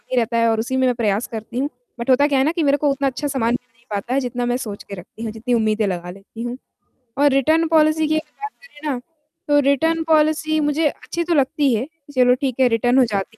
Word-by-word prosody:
ही 255 Hz, -, 0 dB
रहता 235 Hz, 0 st, +1 dB
है 230 Hz, 0 st, +3 dB
और 225 Hz, -1 st, +1 dB
उसी 245 Hz, +4 st, -2 dB
में 260 Hz, -, +2 dB
मैं 250 Hz, -, +1 dB
प्रयास 215 Hz, -1 st, 0 dB
करती 225 Hz, +2 st, -6 dB
हूँ 280 Hz, +2 st, 0 dB, 0.3 s
बट 235 Hz, -, -4 dB
होता 265 Hz, +3 st, +5 dB
क्या 280 Hz, -2 st, +2 dB
है 265 Hz, -, +3 dB
ना 310 Hz, -, +2 dB
कि 335 Hz, -1 st, -1 dB
मेरे 285 Hz, -1 st, +3 dB
को 290 Hz, 0 st, +1 dB
उतना 275 Hz, 0 st, 0 dB
अच्छा 270 Hz, +3 st, -2 dB
सामान 245 Hz, -5 st, 0 dB
मिल 245 Hz, -, -4 dB
नहीं 235 Hz, +1 st, -30 dB
पाता 205 Hz, +4 st, -3 dB
है, 270 Hz, -, +3 dB
जितना 245 Hz, -2 st, -3 dB
मैं 245 Hz, 0 st, 0 dB
सोच 215 Hz, -6 st, -6 dB
के 200 Hz, -, -8 dB
रखती 190 Hz, +5 st, -11 dB
हूँ, 225 Hz, -, -3 dB
जितनी 225 Hz, +3 st, -3 dB
उम्मीदें 220 Hz, -2 st, +1 dB
लगा 175 Hz, -2 st, -4 dB
लेती 195 Hz, +4 st, -12 dB
हूँ 240 Hz, +1 st, -4 dB, 0.6 s
और 290 Hz, +1 st, +5 dB
रिटर्न 315 Hz, +5 st, +3 dB
पॉलिसी 310 Hz, -1 st, +3 dB
की 310 Hz, +1 st, +1 dB
अगर 305 Hz, -1 st, -14 dB
बात 425 Hz, 0 st, -4 dB
करें 305 Hz, -11 st, -8 dB
ना 255 Hz, -, -3 dB, 0.5 s
तो 290 Hz, 0 st, +4 dB
रिटर्न 320 Hz, +4 st, +2 dB
पॉलिसी 310 Hz, 0 st, +2 dB
मुझे 300 Hz, +1 st, +1 dB
अच्छी 340 Hz, +4 st, -5 dB
तो 340 Hz, 0 st, 0 dB
लगती 280 Hz, -2 st, +2 dB
है, 230 Hz, +4 st, -1 dB, 0.3 s
चलो 250 Hz, -1 st, +5 dB
ठीक 265 Hz, -3 st, -2 dB
है, 260 Hz, -, +5 dB
रिटर्न 245 Hz, +2 st, +2 dB
हो 260 Hz, -, +6 dB
जाती 210 Hz, 0 st, -3 dB
260 Hz, 260 wpm, -20 LUFS, 230-295 Hz, 0.6 s, हो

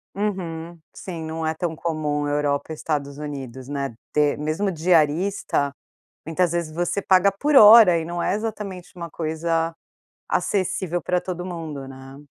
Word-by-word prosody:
Uhum. 175 Hz, -5 st, -4 dB
Sim, 170 Hz, -4 st, -7 dB
não 160 Hz, 0 st, -4 dB
é 160 Hz, -, 0 dB
tão 165 Hz, 0 st, -3 dB
comum 150 Hz, -3 st, -2 dB
Europa, 145 Hz, +1 st, -1 dB
Estados 145 Hz, -3 st, -3 dB
Unidos, 135 Hz, -4 st, -7 dB
né, 140 Hz, -3 st, -3 dB, 0.2 s
ter 150 Hz, -1 st, +2 dB
mesmo 155 Hz, +7 st, -1 dB
diarista, 165 Hz, -2 st, +1 dB, 0.5 s
muitas 170 Hz, +1 st, +1 dB
vezes, 170 Hz, -2 st, -2 dB
você 175 Hz, +4 st, -1 dB
paga 190 Hz, 0 st, +4 dB
por 285 Hz, +9 st, +1 dB
hora 210 Hz, -6 st, +9 dB
e 165 Hz, -, -3 dB
não 170 Hz, +1 st, -3 dB
é -, -, +1 dB
exatamente 205 Hz, -4 st, -5 dB
uma 170 Hz, -1 st, -6 dB
coisa 165 Hz, +1 st, -1 dB, 0.5 s
acessível 185 Hz, -3 st, -1 dB
pra 180 Hz, 0 st, 0 dB
todo 180 Hz, -1 st, -5 dB
mundo, 160 Hz, -6 st, -6 dB
né? 135 Hz, 0 st, -11 dB
165 Hz, 145 wpm, -23 LUFS, 150-180 Hz, 0.5 s, hora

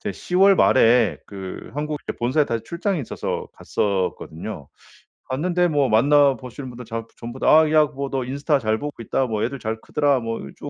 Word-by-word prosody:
제 -, -, -3 dB
10 180 Hz, -, -4 dB
월 195 Hz, +1 st, +7 dB
말에 115 Hz, -1 st, +4 dB
그 95 Hz, -2 st, -8 dB
한국에 150 Hz, +1 st, -2 dB
이제 -, -, -4 dB
본사에 130 Hz, +6 st, +2 dB
다시 115 Hz, -1 st, -2 dB
출장이 170 Hz, -, -2 dB
있어서 130 Hz, -, -4 dB
갔었거든요. 90 Hz, -4 st, -3 dB, 0.6 s
갔는데 175 Hz, +6 st, +1 dB
뭐 145 Hz, -5 st, +1 dB
만나보시는 135 Hz, +1 st, +2 dB
분들 125 Hz, 0 st, -10 dB
전 115 Hz, 0 st, -5 dB
전부 120 Hz, +2 st, -7 dB
다 -, -, -1 dB
"아 155 Hz, -1 st, +2 dB
야 155 Hz, -1 st, +6 dB
뭐 140 Hz, -2 st, -5 dB
너 130 Hz, -2 st, -2 dB
인스타 140 Hz, +3 st, 0 dB
잘 110 Hz, -1 st, 0 dB
보고 145 Hz, -4 st, -6 dB
있다. 130 Hz, +3 st, 0 dB
뭐 110 Hz, -2 st, -2 dB
애들 135 Hz, +2 st, -3 dB
잘 110 Hz, 0 st, -4 dB
크더라." 145 Hz, -3 st, +1 dB
뭐 115 Hz, 0 st, -3 dB, 0.2 s
좀 -, -, -7 dB
130 Hz, 350 characters per minute, -22 LUFS, 115-150 Hz, 0.6 s, 월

